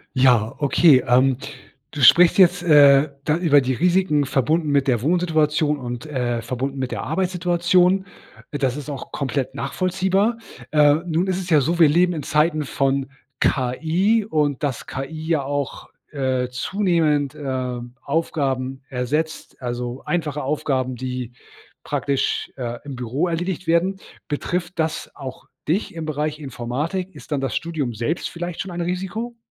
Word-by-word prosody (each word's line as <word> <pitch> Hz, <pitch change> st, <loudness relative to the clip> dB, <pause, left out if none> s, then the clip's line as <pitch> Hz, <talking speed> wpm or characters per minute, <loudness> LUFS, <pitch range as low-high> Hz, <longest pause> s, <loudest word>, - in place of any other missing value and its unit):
Ja, 125 Hz, -2 st, +3 dB
okay. 145 Hz, -2 st, +5 dB
Ähm, 130 Hz, +1 st, +4 dB, 0.5 s
du 145 Hz, -, -5 dB
sprichst 170 Hz, -, +7 dB
jetzt, 180 Hz, -1 st, +5 dB
äh, 145 Hz, -2 st, +6 dB
da 150 Hz, +2 st, +1 dB
über 150 Hz, -5 st, +4 dB
die 130 Hz, 0 st, -1 dB
Risiken 170 Hz, -2 st, +2 dB
verbunden 150 Hz, +4 st, +1 dB
mit 140 Hz, -1 st, +2 dB
der 120 Hz, -3 st, +2 dB
Wohnsituation 155 Hz, -2 st, +1 dB
und, 120 Hz, -1 st, -6 dB
äh, 120 Hz, -5 st, -2 dB
verbunden 130 Hz, +3 st, -4 dB
mit 130 Hz, -1 st, -3 dB
der -, -, -3 dB
Arbeitssituation. 180 Hz, +1 st, +2 dB, 0.5 s
Das 135 Hz, -2 st, -1 dB
ist 150 Hz, 0 st, -7 dB
auch 140 Hz, -, -7 dB
komplett 135 Hz, -1 st, -2 dB
nachvollziehbar. 190 Hz, +9 st, 0 dB, 0.3 s
Äh, 150 Hz, -1 st, +5 dB
nun 170 Hz, +3 st, 0 dB
ist 185 Hz, 0 st, 0 dB
es 185 Hz, -1 st, -6 dB
ja 150 Hz, -3 st, +5 dB
so, 170 Hz, +6 st, -1 dB
wir 160 Hz, -3 st, +7 dB
leben 175 Hz, +3 st, +3 dB
in 155 Hz, -, -4 dB
Zeiten 155 Hz, 0 st, +1 dB
von 135 Hz, 0 st, 0 dB, 0.3 s
KI 165 Hz, -, +1 dB
und 150 Hz, -7 st, 0 dB
dass 135 Hz, -5 st, -2 dB
KI 155 Hz, +4 st, -6 dB
ja 155 Hz, -5 st, +1 dB
auch, 145 Hz, 0 st, -4 dB, 0.2 s
äh, 130 Hz, -3 st, -1 dB
zunehmend, 155 Hz, -1 st, 0 dB
äh, 130 Hz, -3 st, -3 dB, 0.2 s
Aufgaben 135 Hz, -4 st, -2 dB
ersetzt, 145 Hz, +5 st, -3 dB
also 120 Hz, +1 st, -4 dB
einfache 150 Hz, -4 st, -2 dB
Aufgaben, 130 Hz, -3 st, -1 dB
die 125 Hz, -1 st, -5 dB, 0.5 s
praktisch, 140 Hz, -1 st, -1 dB
äh, 120 Hz, -2 st, -4 dB
im 140 Hz, -2 st, -6 dB
Büro 125 Hz, +8 st, -1 dB
erledigt 175 Hz, +1 st, -3 dB
werden. 180 Hz, +4 st, +2 dB, 0.3 s
Betrifft 175 Hz, +4 st, -3 dB
das 160 Hz, -1 st, -2 dB
auch 130 Hz, -1 st, -8 dB, 0.2 s
dich 180 Hz, +5 st, 0 dB
im 165 Hz, -2 st, -5 dB
Bereich 150 Hz, 0 st, -2 dB
Informatik? 150 Hz, +8 st, -4 dB
Ist 150 Hz, -, -14 dB
dann 140 Hz, -, 0 dB
das 135 Hz, -, -2 dB
Studium 155 Hz, -8 st, -2 dB
selbst 120 Hz, +10 st, -2 dB
vielleicht 175 Hz, 0 st, -5 dB
schon 195 Hz, -, -6 dB
ein 175 Hz, 0 st, -4 dB
Risiko? 190 Hz, +7 st, -4 dB
150 Hz, 150 wpm, -22 LUFS, 130-170 Hz, 0.5 s, sprichst